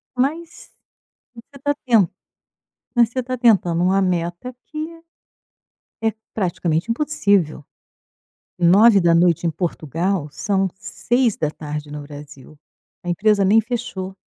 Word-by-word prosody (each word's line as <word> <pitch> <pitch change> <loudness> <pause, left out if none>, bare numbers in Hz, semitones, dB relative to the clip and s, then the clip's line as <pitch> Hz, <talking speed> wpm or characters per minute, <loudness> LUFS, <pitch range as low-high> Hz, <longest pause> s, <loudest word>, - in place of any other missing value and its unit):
Mas 315 +7 -3 0.6
você 275 +4 -15
tá 290 - +2
ten 225 -8 +4 0.9
mas 235 -2 +4
você 255 +2 -3
tá 255 +1 -3
tentando 190 -8 +3
uma 190 +2 +3
meta 175 +6 -2
que 305 - -10 1.3
é 225 0 +1 0.2
praticamente 175 -1 -1
impossível. 200 - +1 1.0
21:00 175 -3 +5
em - - 0
Portugal 170 +1 -2
são 195 +3 0
18:00 160 - -2
no 150 0 -6
Brasil, 145 0 -12 0.5
a 175 - -5
empresa 200 +3 +2
nem 215 +4 +5
fechou. 220 -5 -5
195 Hz, 105 wpm, -20 LUFS, 170-235 Hz, 1.3 s, 21:00